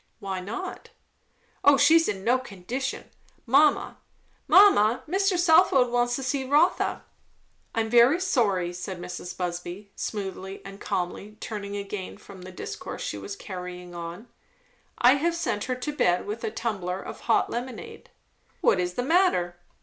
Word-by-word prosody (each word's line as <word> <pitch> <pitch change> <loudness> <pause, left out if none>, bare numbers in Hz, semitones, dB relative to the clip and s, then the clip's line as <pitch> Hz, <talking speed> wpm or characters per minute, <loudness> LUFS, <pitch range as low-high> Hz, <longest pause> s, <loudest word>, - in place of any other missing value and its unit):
"Why 195 -1 -4
not?" 230 - -6 0.7
"O 285 -1 +7
she's 320 +4 +5
in 195 -2 -3
no 250 +4 +3
condition. 255 +4 -5 0.3
Mamma 285 +5 +3 0.5
mamma! 255 - +6
Mr. 385 +2 +1
Southwode 320 -7 +5
wants 245 0 +2
to 270 - -4
see 265 +1 -1
Rotha." 295 +7 +2 0.7
"I 225 - +2
am 220 - -3
very 240 +7 +6
sorry!" 200 - +1
said 180 0 -6
Mrs. 180 0 -7
Busby 180 +3 -5
smoothly 195 -2 -5
and 195 +1 -10
calmly, 200 +2 -4
turning 205 -2 -5
again 200 -1 -6
from 200 -2 -13
the 185 +1 -9
discourse 180 - -7
she - - -4
was 400 - -6
carrying 180 - -8
on, 170 +6 -7 0.7
"I 250 +3 +5
have 335 +4 0
sent 235 -11 -2
her 255 - -1
to 255 +4 -4
bed 180 -9 +2
with 210 +3 -5
a - - -1
tumbler 195 -5 -3
of - - -8
hot 230 - +1
lemonade." 260 - -6 0.5
"What 190 - +3
is 180 0 -2
the 245 - -1
matter?" 275 - +2
220 Hz, 150 wpm, -26 LUFS, 185-275 Hz, 0.7 s, O